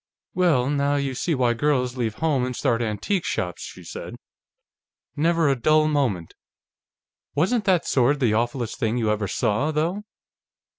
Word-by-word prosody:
"Well, 160 -9 +2
now 140 0 +1
you 140 -2 -1
see 160 +6 -1
why 125 -2 +2
girls 125 -1 0
leave 115 -4 -2
home 150 -6 0
and 125 0 -3
start 115 0 0
antique 115 - -1
shops," 90 -1 -3
she - - -9
said. - - -8 1.0
"Never 165 +1 +2
a 140 - +3
dull 155 +5 +3
moment.... 125 - -1 1.0
Wasn't 210 +8 +1
that 185 -4 +2
sword 135 +2 +2
the 120 -6 +2
awfullest 120 +1 -1
thing 115 +1 0
you 110 -3 +1
ever 105 -1 -1
saw, 105 +9 0
though?" 160 +6 -1
135 Hz, 155 wpm, -24 LUFS, 120-155 Hz, 1.0 s, a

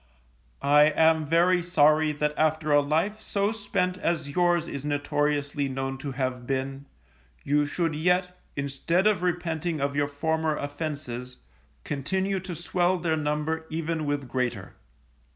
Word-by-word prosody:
I 145 +1 +6
am 160 0 +3
very 175 +3 +4
sorry 155 -2 +4
that 150 0 -1
after 155 0 +1
a 145 0 +6
life 165 +9 0
so 200 -1 0
spent 195 -4 -1
as 160 -5 -1
yours 175 +1 +2
is 140 - -5
notoriously 145 -1 0
known 135 0 -3
to 140 -2 -5
have 130 -2 -3
been, 135 +1 -3 0.6
you 145 +1 +2
should 165 +1 -1
yet, 180 +3 +1 0.2
instead 140 +6 0
of 210 -5 +3
repenting 170 -2 -1
of 140 0 -1
your 145 0 +1
former 160 +2 -1
offences, 145 -4 -5 0.5
continue 190 +7 -1
to 180 -1 -6
swell 175 +2 +1
their 165 -2 0
number 155 +1 -2
even 160 -1 -2
with 145 -2 -2
greater. 125 0 -2
155 Hz, 140 wpm, -26 LUFS, 145-175 Hz, 0.6 s, I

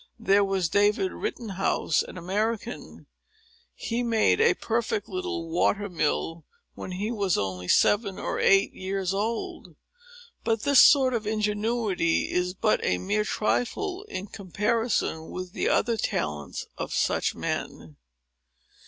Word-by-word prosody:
There 205 -3 +3
was 195 -3 0
David 205 - +2
Rittenhouse, 210 - -1
an - - -8
American,—he 230 - -5
made 230 - +2
a 465 - +4
perfect 225 -2 -2
little 365 -2 -4
water 205 -11 +1
mill, 165 0 -1 0.3
when 185 - -7
he 205 +5 -2
was 200 -5 0
only 95 -2 -3
seven 200 - +3
or - - -3
eight 195 0 +4
years 190 0 -2
old. 220 +3 -3 0.7
But 225 -1 0
this 285 -2 +6
sort 270 -4 +6
of 220 -3 -2
ingenuity 210 -4 0
is 180 +1 -1
but 215 +3 +1
a 90 - +1
mere 210 - 0
trifle 360 - -1
in 195 - -5
comparison 205 -3 -1
with 185 0 -6
the - - 0
other 230 -1 +2
talents 75 - -3
of - - -4
such - - +1
men." 80 -2 -5
210 Hz, 125 wpm, -26 LUFS, 185-235 Hz, 0.7 s, this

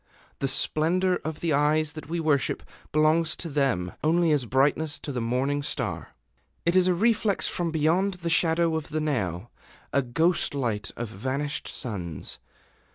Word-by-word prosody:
The 135 - 0
splendor 175 +7 +2
of 155 0 -6
the 165 -3 +1
eyes 150 +1 +2
that 155 -1 -9
we 170 +1 -1
worship 150 -4 +1 0.3
belongs 155 +2 +3
to 170 - -6
them 135 - 0
only 165 +1 +3
as 140 -5 +1
brightness 145 +4 +1
to 145 - -6
the 125 -3 -2
morning 130 +5 0
star. - - -3 0.5
It 170 +1 +2
is 185 -1 +5
a 180 - +3
reflex 220 0 +2
from 175 -1 -1
beyond 165 +5 +1
the 170 -2 -4
shadow 165 0 +3
of 160 -1 -4
the 155 - -1
Now, 115 - -2 0.4
a 140 - +4
ghost 160 +6 +1
light 115 -7 -2
of 120 - -3
vanished 135 +8 -3
suns. 90 - -3
155 Hz, 160 wpm, -26 LUFS, 130-165 Hz, 0.5 s, is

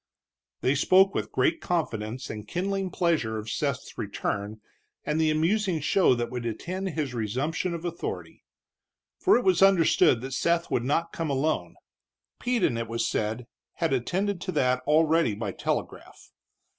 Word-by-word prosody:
They 130 - +2
spoke 190 +7 +4
with - - -3
great 330 -2 +1
confidence 125 -7 -2
and 105 0 -8
kindling 195 - -2
pleasure 165 -12 0
of 110 0 -5
Seth's - - -3
return, 105 +2 -3 0.5
and 150 +1 0
the 160 - +3
amusing 170 +3 +1
show 155 -1 +3
that 120 -1 -3
would 125 -1 -4
attend 180 - -4
his 150 -6 -3
resumption 135 - -2
of 170 +1 -7
authority. 170 -1 -5 0.8
For 385 - +5
it 245 - -1
was 185 -2 +3
understood 170 -10 +5
that 130 +1 -6
Seth 170 +5 0
would 120 - +1
not 165 +6 0
come 165 -2 -3
alone. 145 +3 -1 0.6
Peden, 235 - +1
it 115 0 -3
was 115 +1 -1
said, 110 +3 -2 0.3
had 165 -4 -1
attended 185 - -1
to 185 - -3
that 125 0 +2
already 160 -5 +3
by 105 -2 -3
telegraph. - - -5
155 Hz, 155 wpm, -27 LUFS, 120-180 Hz, 0.8 s, For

